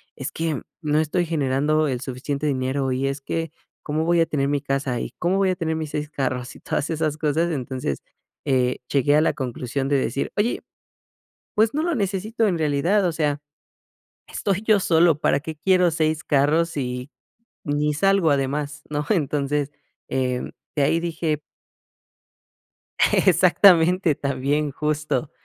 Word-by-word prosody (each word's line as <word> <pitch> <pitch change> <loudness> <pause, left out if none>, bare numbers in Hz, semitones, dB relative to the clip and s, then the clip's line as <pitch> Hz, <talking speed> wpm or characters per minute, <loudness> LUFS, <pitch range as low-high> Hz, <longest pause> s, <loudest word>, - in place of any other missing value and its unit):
es 140 +1 -5
que 160 -4 -2 0.2
no 150 0 +1
estoy 165 +3 0
generando 155 0 +1
el 125 -2 -2
suficiente 135 +2 -4
dinero 135 -1 0
y 130 +2 0
es 135 +1 -2
que, 165 +2 -3 0.3
¿cómo 155 +1 -1
voy 170 0 +3
a 165 - +4
tener 140 -3 -1
mi 145 -1 0
casa 135 -3 -1
y - - -5
cómo 180 +2 +1
voy 195 -1 +2
a - - -1
tener 160 -2 -2
mis 160 -1 -4
6 150 0 -3
carros?, 130 -4 -3
y - - -13
todas 140 - -2
esas 155 -2 -1
cosas? 160 +3 +1
Entonces, 130 - -3 0.4
eh, 130 -2 +1
llegué 145 +1 +3
a 155 - +5
la 160 - +2
conclusión 130 0 -3
de 140 - +2
decir, 130 +1 -2
oye, 225 +4 0 0.9
pues 220 +1 +3
no 305 +2 0
lo 345 -1 0
necesito 210 +2 0
en 180 -4 +1
realidad, 160 +6 +2
o 175 - +2
sea, 150 -2 -1 0.9
estoy 200 -1 -1
yo 215 -2 +3
solo, 165 -3 +3
¿para 140 - +2
qué 160 +1 -6
quiero 180 +2 +3
6 155 -1 0
carros 150 +4 +2
sí 125 -3 -4 0.5
ni 150 +1 0
salgo 195 +1 +3
además, 145 +2 -1
no? 150 0 -2
Entonces, 145 -4 0 0.4
eh, 125 -1 -1 0.3
de 145 - +2
ahí 165 +4 +2
dije 160 -2 -2 1.7
Exactamente, 180 -3 +5
también, 140 +2 -1
justo. 150 +1 -2
150 Hz, 160 wpm, -23 LUFS, 140-165 Hz, 1.7 s, a